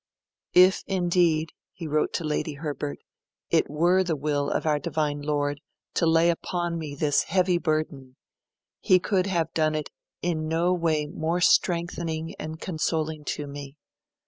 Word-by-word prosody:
'If 185 +2 +6
indeed,' 175 -4 +2 0.2
he 175 -3 -8
wrote 155 0 0
to - - -2
Lady 150 0 -1
Herbert, 145 -1 -4 0.5
'it - - +3
were 175 +5 +3
the 170 -3 -1
will 145 0 -1
of - - -1
our 150 -2 +2
Divine 145 -1 -2
Lord 145 -1 -1 0.3
to 165 - +2
lay 165 +1 +5
upon 175 0 -3
me 150 -3 -6
this 145 0 +1
heavy 180 -1 +2
burden, 155 -5 -2 0.6
He 185 - +5
could 185 +1 0
have 165 -4 -1
done 155 -1 +1
it 155 -1 -4 0.3
in 160 -3 -1
no 170 +3 +2
way 160 -4 +1
more 160 +3 -2
strengthening 170 -2 +1
and 155 +1 -6
consoling 160 -3 -2
to 145 - -3
me. 140 0 -9
160 Hz, 150 wpm, -26 LUFS, 150-175 Hz, 0.6 s, If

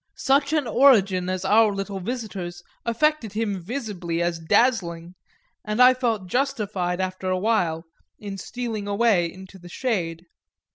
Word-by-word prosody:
Such 280 +1 +2
an 305 -3 +1
origin 205 -8 +4
as 185 0 -3
our 215 +2 +5
little 195 0 -4
visitor's 190 -5 -5 0.2
affected 235 -2 +1
him 210 -3 -2
visibly 185 -6 -4
as 170 -1 -1
dazzling, 170 -2 +1 0.5
and 210 +2 -3
I 250 +1 +8
felt 230 -6 -1
justified 200 -6 -1
after 185 0 -3
a 185 - +1
while, 180 -6 0 0.3
in 200 -2 -7
stealing 225 -1 -5
away 200 -5 +2
into 190 0 -13
the 175 0 -12
shade. 175 -7 -2
200 Hz, 140 wpm, -24 LUFS, 180-235 Hz, 0.5 s, I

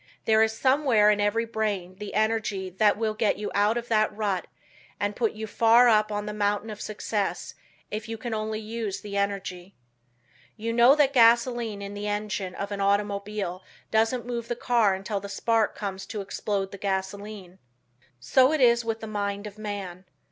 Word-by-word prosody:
There 220 0 +4
is 220 0 +3
somewhere 260 -6 +4
in 205 0 +1
every 215 +3 +1
brain 205 -5 -3
the 210 -1 -6
energy 215 -3 0
that 205 +3 +3
will 220 -1 -1
get 215 -1 +1
you 210 - -4
out 205 +3 +2
of 240 0 -4
that 215 -1 +3
rut 205 -4 -2 0.5
and 205 0 -1
put 230 -3 0
you 220 0 -5
far 230 +3 +5
up 215 -1 +3
on 205 0 -2
the 210 - -4
mountain 205 +1 -1
of 210 - -8
success 210 -1 -3 0.4
if 215 +2 -5
you 225 - -4
can 235 0 -5
only 215 0 -2
use 220 -2 -4
the 205 -1 -7
energy. 195 -2 -3 0.8
You 230 +1 -3
know 240 +4 +6
that 285 -2 +3
gasoline 235 -3 +3
in 200 0 -6
the 205 +1 -5
engine 205 -3 -3
of 200 +1 -5
an 200 0 -3
automobile 200 -2 -1 0.3
doesn't 225 +2 +1
move 235 -1 -4
the 240 - -2
car 230 -5 +2
until 195 +2 -3
the 200 +1 -8
spark 225 +2 +1
comes 195 -2 -5
to 210 - -4
explode 195 0 -3
the 200 - -9
gasoline. 195 -1 -4 0.6
So 255 - +4
it 310 - +1
is 235 -2 +5
with 225 -1 -3
the - - -5
mind 205 -1 -3
of 210 0 -9
man. 195 -4 -6
210 Hz, 185 wpm, -26 LUFS, 200-225 Hz, 0.8 s, know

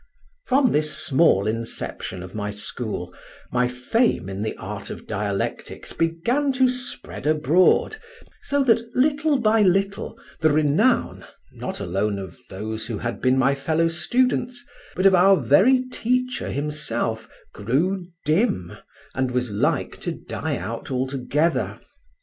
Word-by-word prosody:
From 260 -2 +4
this 150 0 0
small 155 - +3
inception 110 -4 -4
of 95 - -10
my 105 -1 -3
school, 105 -3 -5 0.4
my 125 0 +2
fame 125 - 0
in 95 +1 -5
the 110 - -3
art 100 0 -7
of - - -8
dialectics 100 -2 -3
began 235 - 0
to 260 0 +4
spread 250 -10 -5
abroad, 155 - +3 0.4
so 285 0 +1
that 230 -3 +4
little 295 +2 +2
by 225 -2 +3
little 195 +1 +1 0.2
the 160 - +4
renown, 150 -1 +2 0.3
not - - -6
alone 100 +3 -1
of 95 -4 -8
those 110 +3 -5
who 115 -3 -3
had 115 +2 -4
been 130 0 +3
my 135 +1 +3
fellow 160 +4 +1
students, 245 +7 0 0.3
but 185 - 0
of 195 - +7
our 190 +2 +6
very 255 +9 +4
teacher 250 +1 -1
himself, 120 -6 -3 0.2
grew 170 - -1 0.2
dim 155 - +1 0.4
and 130 0 0
was 125 -2 -1
like 100 - 0
to - - -4
die - - -4
out 110 +6 -6
altogether. 135 +5 -1
150 Hz, 135 wpm, -23 LUFS, -, 0.4 s, of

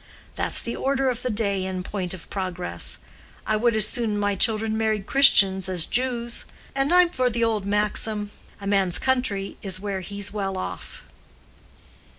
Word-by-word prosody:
That's - - -1
the 235 - -3
order 270 -1 +1
of 245 0 -6
the 255 - -2
day 200 -4 0
in 185 -1 -3
point 185 -2 -4
of 175 - -12
progress. 185 -2 -3 0.5
I 215 - +1
would 230 +1 +2
as 215 -1 +5
soon 225 -4 -1
my 205 0 +1
children 220 +2 +2
married 220 -2 0
Christians 195 -9 +5
as 175 -3 +2
Jews. 240 -1 -1 0.3
And 270 +3 0
I'm 360 0 +6
for 255 -5 +1
the 235 0 0
old 215 -3 0
maxim, 210 0 +1 0.3
'A 200 - -9
man's 195 -3 +2
country 250 -7 0
is 190 -2 -3
where 200 -1 -3
he's 200 +1 -6
well 195 -2 -2
off. 185 - -6
210 Hz, 165 wpm, -24 LUFS, 195-235 Hz, 0.5 s, I'm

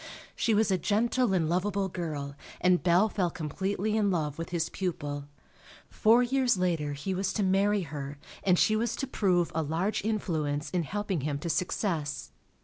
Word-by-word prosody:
She 225 -3 +2
was 215 -1 +3
a 185 - +2
gentle 230 +5 +1
and 175 -4 +2
lovable 190 +3 0
girl, 150 -6 -4 0.2
and 180 -1 +3
Bell 180 +4 +4
fell 190 -4 0
completely 190 +7 -2
in 210 -2 +2
love 155 -5 -1
with 165 - -4
his 170 -2 -1
pupil. 145 -6 -3 0.7
Four 230 +3 +5
years 250 -3 +2
later 165 -5 0
he 150 +7 -3
was 190 0 -1
to 210 - 0
marry 200 +2 +3
her 145 -2 -6 0.3
and 185 -2 +4
she 215 - +4
was 225 +1 0
to 270 - -2
prove 185 -9 +1
a 160 - 0
large 165 +8 -1
influence 155 -9 -1
in 180 - +1
helping 195 0 -2
him 145 +1 -1
to 165 +3 -2
success. 160 -2 -2
180 Hz, 175 wpm, -29 LUFS, 155-205 Hz, 0.7 s, Four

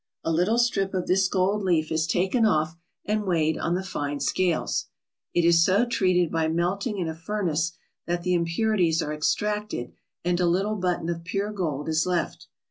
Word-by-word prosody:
A 165 - 0
little 180 +8 +2
strip 200 -5 +1
of 185 - -1
this 190 +1 +3
gold 195 +2 +1
leaf 165 -5 +1
is 160 0 +1
taken 185 +7 +1
off 155 -6 +2 0.3
and 210 0 0
weighed 160 -4 +1
on 170 - 0
the 185 - -2
fine 145 -6 -3
scales. 175 0 0 0.5
It 175 - +3
is 170 -1 +6
so 200 +7 +3
treated 185 -7 +2
by 165 -1 +1
melting 185 +7 -1
in 175 -3 -1
a 160 - -3
furnace 165 -2 -1 0.3
that 175 0 -1
the 180 0 +1
impurities 170 0 +1
are 150 - -3
extracted 210 - -1 0.3
and 175 0 +1
a 180 - +2
little 195 +5 +1
button 180 -4 -1
of 170 -1 -3
pure 195 +4 -2
gold 155 -7 -3
is 160 +2 +1
left. 180 -2 -2
175 Hz, 185 wpm, -25 LUFS, 165-195 Hz, 0.5 s, is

